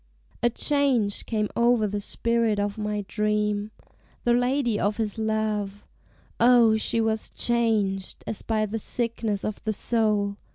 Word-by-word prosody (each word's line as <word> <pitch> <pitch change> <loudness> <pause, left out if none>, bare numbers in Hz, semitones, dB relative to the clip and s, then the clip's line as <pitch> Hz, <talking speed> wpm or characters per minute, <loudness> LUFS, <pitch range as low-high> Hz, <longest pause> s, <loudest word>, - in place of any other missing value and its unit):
A 240 - +4
change 255 -6 +1
came 215 -2 0
o'er 235 -2 +3
the 205 0 -2
spirit 230 0 0
of 205 0 -1
my 210 -1 -3
dream. 210 -1 0 0.5
The 240 - +3
lady 245 -2 +1
of 205 +1 0
his 220 -1 -2
love; 215 -2 -2 0.5
O, 235 -2 +6
she 220 +1 0
was 220 -1 0
changed, 215 -5 0
As 215 - -4
by 215 -1 0
the 220 +2 -4
sickness 225 -3 -2
of 215 - -4
the 220 - -1
soul! 210 -3 +1
220 Hz, 140 wpm, -25 LUFS, 210-235 Hz, 0.5 s, O